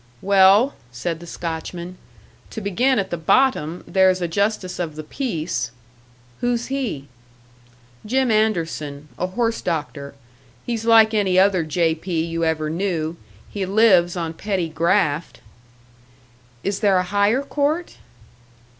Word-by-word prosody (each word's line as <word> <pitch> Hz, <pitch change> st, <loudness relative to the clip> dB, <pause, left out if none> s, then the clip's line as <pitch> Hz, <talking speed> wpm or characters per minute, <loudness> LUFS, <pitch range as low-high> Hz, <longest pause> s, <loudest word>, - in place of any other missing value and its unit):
"Well," 200 Hz, +6 st, +5 dB, 0.2 s
said 160 Hz, +7 st, -4 dB
the 170 Hz, -, -11 dB
Scotchman, 170 Hz, +2 st, -6 dB, 0.5 s
"to -, -, -6 dB
begin 240 Hz, +6 st, +1 dB
at 195 Hz, -2 st, -2 dB
the 175 Hz, -, -2 dB
bottom, 170 Hz, -, +1 dB
there's 190 Hz, -1 st, +3 dB
a 175 Hz, -, -1 dB
justice 200 Hz, +1 st, -1 dB
of 165 Hz, -4 st, -3 dB
the 155 Hz, -, -6 dB
peace." 170 Hz, -, -3 dB, 0.7 s
"Who's 245 Hz, 0 st, 0 dB
he?" 220 Hz, -, -3 dB, 1.0 s
"Jim 255 Hz, +2 st, +1 dB
Anderson, 165 Hz, -9 st, -1 dB
a 180 Hz, -, 0 dB
horse 230 Hz, +4 st, -1 dB
doctor. 150 Hz, -4 st, -4 dB, 0.5 s
He's 230 Hz, -2 st, -3 dB
like 225 Hz, -1 st, +6 dB
any 195 Hz, -4 st, +2 dB
other 190 Hz, -2 st, +4 dB
J.P. 160 Hz, +1 st, -1 dB
you 165 Hz, 0 st, -3 dB
ever 160 Hz, -1 st, 0 dB
knew 165 Hz, -1 st, -2 dB, 0.3 s
he 200 Hz, -, -4 dB
lives 190 Hz, -3 st, +4 dB
on 165 Hz, -2 st, -3 dB
petty 185 Hz, -1 st, -2 dB
graft." 160 Hz, -5 st, 0 dB, 1.2 s
"Is 200 Hz, 0 st, -2 dB
there 200 Hz, -4 st, +3 dB
a 180 Hz, -, +2 dB
higher 205 Hz, +7 st, +1 dB
court?" 295 Hz, +5 st, -1 dB
185 Hz, 130 wpm, -21 LUFS, 165-215 Hz, 1.2 s, like